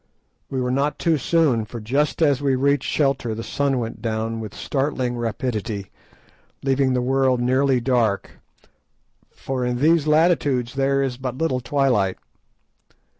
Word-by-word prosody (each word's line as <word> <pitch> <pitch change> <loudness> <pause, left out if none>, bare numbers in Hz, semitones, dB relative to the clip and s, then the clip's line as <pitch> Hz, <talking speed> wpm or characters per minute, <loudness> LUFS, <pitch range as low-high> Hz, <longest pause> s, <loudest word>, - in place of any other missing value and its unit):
We 135 - -2
were 125 0 -1
not 140 +3 0
too 165 -3 +1
soon, 140 -6 +2
for 115 +2 -8
just 140 +9 0
as 145 -3 +3
we 135 -2 +2
reached 140 +1 +1
shelter 135 -6 0
the 115 - -5
sun 140 +4 0
went 115 -2 -4
down 115 0 -2
with 110 -2 -7
startling 135 -3 -2
rapidity, 110 -3 -3 0.7
leaving 135 -1 +2
the 125 -1 0
world 130 -1 +2
nearly 130 +1 +2
dark, 115 -5 0 0.9
for 130 -1 -4
in 125 0 -1
these 155 +3 +3
latitudes 150 -6 +2
there 135 0 +1
is 130 -2 -3
but 130 -1 -5
little 160 -5 0
twilight. 125 -8 +1
130 Hz, 145 wpm, -22 LUFS, 120-140 Hz, 0.9 s, as